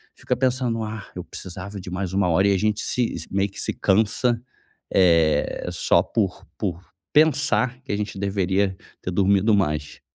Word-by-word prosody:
fica - - -2
pensando: 125 -3 0
"Ah, 110 -1 -6
eu 90 - -5
precisava 95 +3 -8
de 90 - -8
mais 95 -1 -3
1 100 -1 +2
hora.", 95 +4 +3
e - - +4
a - - +1
gente 105 +2 0
se 125 -2 0
s 80 - -6
meio 100 +1 +1
que - - -10
se - - 0
cansa, 110 +4 +2 0.5
eh, 85 -4 +3
só - - +3
por 100 -6 -2
por 90 -4 -3 0.3
pensar 145 -4 +3
que 135 - -6
a - - 0
gente 105 -1 -4
deveria 95 -1 0 0.3
ter 90 - -4
dormido 100 +3 +3
mais. 75 -6 -1
100 Hz, 175 wpm, -23 LUFS, 95-110 Hz, 0.5 s, e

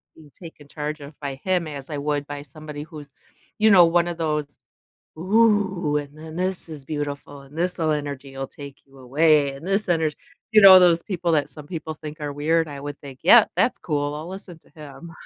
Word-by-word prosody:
being 150 -3 -17
taken 155 -4 -12
charge 150 0 -5
of 140 +1 -12
by 140 -2 -5
him, 180 -3 0
as 140 -3 -8
I 150 - -4
would 145 0 -2
by 145 0 -6
somebody 150 0 -9
who's, 150 -3 -11 0.5
you 220 0 +4
know, 180 -3 +8
one 170 +1 +2
of 170 -1 -4
those, 150 -3 -2 0.6
ooh, 190 -6 +2
and 145 +1 -6
then 160 0 -10
this 185 -1 -3
is 145 -4 -9
beautiful, 145 -1 -5
and 140 +3 -15
this'll 170 -2 0
energy 140 -2 -5
will 135 - -4
take 140 -1 -11
you 135 0 -20
away, 145 +2 +3
and 140 +7 -10
this 195 +1 0
energ 160 -3 +1 0.4
you 215 - +7
know, 190 -1 +10
those 170 -2 +4
people 175 -3 -2
that 145 -2 +1
some 150 -2 -10
people 160 -2 -5
think 155 0 -9
are 145 -1 -4
weird, 160 +3 +1
I 140 -1 -8
would 145 0 -7
think, 135 -2 -11
yep, - - +7
that's - - +2
cool, 145 -1 -2
I'll 155 +2 -6
listen 185 -3 -9
to - - -27
him. 150 +2 -11
150 Hz, 210 wpm, -23 LUFS, 145-170 Hz, 0.6 s, know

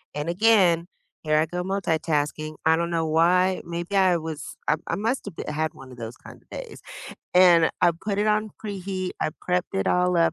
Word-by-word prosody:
And 150 +2 -3
again, 180 -3 +4 0.4
here 155 -1 +2
I 155 - +3
go 180 +2 -3
multitasking 155 -5 -1
I 160 0 +5
don't 170 0 -1
know 165 -1 0
why, 180 +4 +3
maybe 170 +3 -4
I 185 -2 +4
was 160 -2 -6
I 150 - +4
I - - -1
must 230 +6 -2
of - - -7
b - - -5
have 150 - -4
had 155 +1 -1
one 135 -1 -13
of 125 - -12
those 115 0 -7
kinda - - -14
days, - - -8 0.5
and 175 -3 +6
I - - +5
put 205 -2 -1
it 210 - +1
on 215 0 +1
preheat, 190 -3 -4
I - - 0 0.2
prepped 180 0 0
it 95 - 0
all 180 0 +2
up, 165 -1 +3
170 Hz, 210 wpm, -25 LUFS, 155-185 Hz, 0.5 s, and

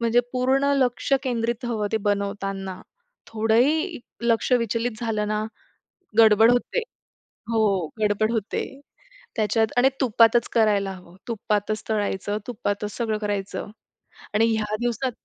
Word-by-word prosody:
म्हणजे 235 +1 +3
पूर्ण 260 +2 +2
लक्ष 255 +1 0
केंद्रित 235 -1 -2
हवं 220 -3 -1
ते - - +3
बनवताना. 195 -2 -3 0.5
थोडंही 250 - +1 0.2
लक्ष 235 +1 +1
विचलित 230 -1 0
झालं 215 -3 -1
ना, 215 0 -1 0.8
गडबड 220 +1 +7
होते. 245 - +1 0.7
हो. 205 -6 +2
गडबड 215 +1 +1
होते 220 -3 -2 0.7
त्याच्यात. 220 +1 +2
आणि 255 +2 +6
तुपातच 235 -1 +4
करायला 205 -4 +2
हवं, 180 -1 -13
तुपातच 215 -1 -1
तळायचं, 205 -1 -1
तुपातच 205 -3 -3
सगळं 220 -3 -1
करायचं. 205 -1 -3 0.6
आणि 215 +2 +4
ह्या 215 -1 -1
दिवसात 245 +2 -1
220 Hz, 120 wpm, -24 LUFS, 205-240 Hz, 0.8 s, गडबड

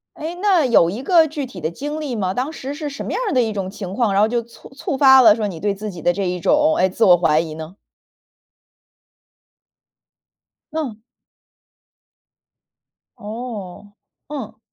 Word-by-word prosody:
诶， 320 +3 -5
那 375 -7 +3
有 170 -9 +4
一 215 +8 -6
个 330 +1 +4
具 290 -3 -4
体 195 -7 -10
的 155 0 -2
经 295 - -5
历 280 -6 -4
吗？ 190 -3 -1
当 260 +7 -2
时 275 -2 -6
是 300 0 -5
什 280 0 -7
么 - - -4
样 - - -1
儿 - - -2
的 255 - +3
一 225 -2 0
种 195 -2 -4
情 195 -2 -7
况， 225 -2 +1
然 195 - +2
后 210 - +5
就 235 +1 -1
促 235 +1 -16
触发 270 -1 +5
了 220 -4 +7
说 215 -2 -2
你 170 -5 -6
对 205 +3 0
自 210 +2 -6
己 175 -4 -10
的 175 - +3
这 195 +2 -2
一 180 0 -3
种， 300 - +3
哎， 190 - +3
自 205 +5 0
我 180 -2 +7
怀 155 -3 +2
疑 160 -1 -3
呢？ 160 +4 -9 3.0
嗯。 275 -9 -4 2.2
哦， 210 -3 -8 0.4
嗯。 230 -7 -7
220 Hz, 195 characters per minute, -20 LUFS, 190-280 Hz, 3.0 s, 了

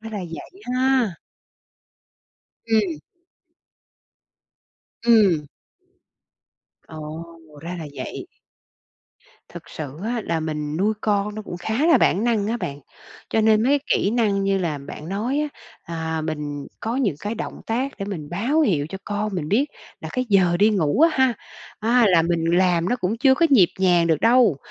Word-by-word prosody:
Ra 225 0 -8
là 210 - -4
vậy 180 - -9
ha. 255 -7 +2 1.5
Ừm. 205 -9 +1 2.1
Ừm. 195 -10 +4 1.4
Ồ. 155 +1 -7 0.4
Ra 175 +3 -6
là 160 - -6
vậy. - - -6 1.2
Thực - - -11
sự 150 -2 -7
á 235 +1 -1
là 165 -1 -1
mình 150 -1 -3
nuôi 205 +5 +2
con 205 0 0
nó 215 - -6
cũng 175 - -7
khá 220 - -1
là 335 - +6
bản 200 +6 +2
năng 225 -4 +1
á 230 +3 -1
bạn. 145 -10 -5 0.5
Cho 220 - +2
nên 220 0 +4
mấy 280 +4 +3
kỹ 200 - +1
năng 210 -4 +1
như 195 0 +1
là 165 -6 -2
bạn 145 +3 -9
nói 225 +9 -1
á, 300 - 0 0.5
à, 160 0 -2
mình 150 -2 -4
có 225 +3 -2
những 240 - +1
cái 210 +2 -3
động - - -6
tác 255 +5 -1
để 195 - -3
mình 175 -7 -6
báo 240 - +1
hiệu 165 - +1
cho 195 - -6
con 205 0 -3
mình 160 -5 -3
biết 240 - +2 0.3
là - - -6
cái 255 -1 -1
giờ 180 -4 +4
đi 210 +3 +4
ngủ 185 - +1
á 325 - +7
ha, 260 -3 +3 0.5
à, 235 +3 +4
là 175 -3 +5
mình 170 0 0
làm 175 0 +2
nó 245 - +1
cũng 210 -1 -2
chưa 265 +2 +5
có 335 +5 +3
nhịp 210 -11 +6
nhàng 175 -3 +3
được 160 -3 +1
đâu. 235 - +4
200 Hz, 170 wpm, -22 LUFS, 165-230 Hz, 2.1 s, á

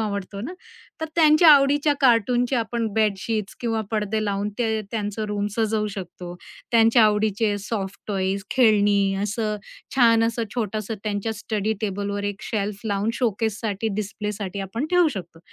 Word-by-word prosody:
आवडतो 200 -2 -3
ना, 265 - -5 0.5
तर 320 - -1
त्यांच्या 315 0 +6
आवडीच्या 290 +1 +4
कार्टूनचे 245 0 +3
आपण 230 0 -1
बेडशीट्स 215 -1 -1
किंवा 225 -2 -1
पडदे 215 0 -1
लावून 200 0 -1
ते 220 -2 0
त्यांचं 215 -1 -3
रूम 205 0 -1
सजवू 220 -1 +1
शकतो. 180 -2 -7 0.4
त्यांच्या 230 +1 +5
आवडीचे 210 0 +2
सॉफ्ट 200 -1 -4
टॉयज, 195 -1 -1
खेळणी, 205 -5 +3
असं, 210 +1 -1 0.4
छान 230 -3 +5
असं 230 0 -1
छोटंसं 215 -2 -2
त्यांच्या 210 +1 -2
स्टडी 210 0 -2
टेबलवर 200 0 -2
एक 205 0 -4
शेल्फ 205 -2 -3
लावून 205 0 0
शोकेससाठी, 220 -2 -1
डिस्प्लेसाठी 205 -1 -4
आपण 225 +9 -3
ठेवू 355 -2 +4
शकतो. 170 -3 -8
215 Hz, 140 wpm, -23 LUFS, 200-230 Hz, 0.5 s, त्यांच्या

